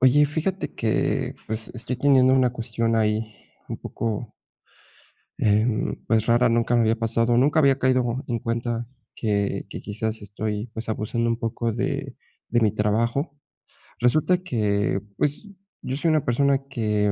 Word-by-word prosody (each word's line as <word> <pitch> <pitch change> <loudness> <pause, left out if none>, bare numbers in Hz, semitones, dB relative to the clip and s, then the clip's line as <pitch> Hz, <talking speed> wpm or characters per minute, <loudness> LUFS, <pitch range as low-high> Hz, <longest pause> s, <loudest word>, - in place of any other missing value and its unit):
Oye, 140 +3 +5
fíjate 165 +6 -2
que 110 -2 0
pues, 110 0 -4
estoy 125 +2 -3
teniendo 130 -1 +5
una 130 -2 +3
cuestión 115 -1 -1
ahí 110 0 0 0.3
un - - -4
poco 115 0 -4 1.1
em, 110 +2 +2
pues 110 -1 +2
rara, 120 +1 +4
nunca 115 +1 +2
me 120 - +4
había 110 0 +2
pasado, 115 +1 +1
nunca 145 +5 +4
había 140 -2 +4
caído 130 -1 +1
en 120 -2 -1
cuenta 115 0 -2 0.3
que 100 -3 -1
que - - -6
quizás 110 +1 -4
estoy 105 +1 -4
pues, 110 0 -6
abusando 115 +2 -1
un 115 - -1
poco 115 0 -2
de 115 - -3 0.3
de 120 - +2
mi 110 -3 +3
trabajo. 115 +8 0 0.6
Resulta 155 +9 +3
que 105 - 0 0.2
pues, 150 +9 -1 0.3
yo 130 - -3
soy 165 +3 +1
una 155 -3 +2
persona 140 +3 +2
que 105 -5 +1
115 Hz, 150 wpm, -24 LUFS, 110-130 Hz, 1.1 s, Oye